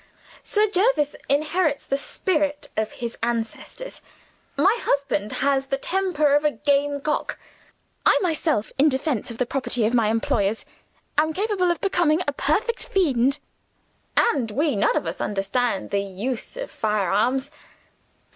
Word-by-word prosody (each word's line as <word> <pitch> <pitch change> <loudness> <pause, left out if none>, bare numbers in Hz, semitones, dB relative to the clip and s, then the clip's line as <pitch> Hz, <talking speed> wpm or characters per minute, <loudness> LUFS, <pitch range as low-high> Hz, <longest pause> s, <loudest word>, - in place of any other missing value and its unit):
Sir 425 +1 +1
Jervis 385 - +2
inherits 305 +1 +1
the 275 - 0
spirit 295 -1 -1
of 220 0 -1
his 235 -1 -6
ancestors. 235 - -4 0.6
My 385 +10 +4
husband 260 -8 0
has 270 -1 +2
the 270 - 0
temper 340 -4 +1
of 295 +1 +4
a 300 - +4
game 285 -1 0
cock. 300 +1 -2 0.7
I - - +5
myself, 315 - 0
in 300 +3 +6
defense 265 -4 -1
of 230 - -7
the 250 - +1
property 250 -3 -1
of 225 - +1
my 230 -3 +3
employers, 215 -1 0 0.5
am 315 +1 +2
capable 390 -1 0
of 345 - 0
becoming 350 -4 +2
a 285 - +1
perfect 430 - 0
fiend. 280 - +2 0.8
And 260 - +3
we 285 +5 0
none 200 - +2
of - - -1
us 165 +2 -4
understand 200 +2 -1
the 200 - +2
use 210 - -4
of - - -5
firearms!" 215 +6 0
280 Hz, 145 wpm, -24 LUFS, 235-320 Hz, 0.8 s, in